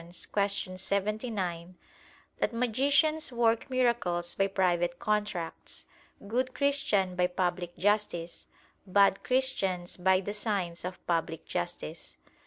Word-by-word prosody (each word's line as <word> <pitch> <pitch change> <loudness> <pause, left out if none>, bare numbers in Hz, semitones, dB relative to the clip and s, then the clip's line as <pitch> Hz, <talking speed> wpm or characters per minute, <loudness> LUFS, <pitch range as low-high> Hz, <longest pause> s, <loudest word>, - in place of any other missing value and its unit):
79) 195 -3 -2 0.6
that - - +1
"magicians 280 +6 +2
work 230 -1 +2
miracles 235 -9 +1
by 195 - +2
private 175 -3 +1
contracts; 210 -6 -2 0.4
good 255 +4 -1
Christians 210 -10 +1
by 180 0 +3
public 180 -1 -2
justice, 200 -4 0 0.4
bad 195 +1 +4
Christians 200 -9 0
by 190 +1 +4
the 205 +2 -4
signs 200 -5 -2
of 180 +1 -6
public 165 -2 -1
justice." 85 - -5
195 Hz, 100 wpm, -30 LUFS, 175-235 Hz, 0.6 s, bad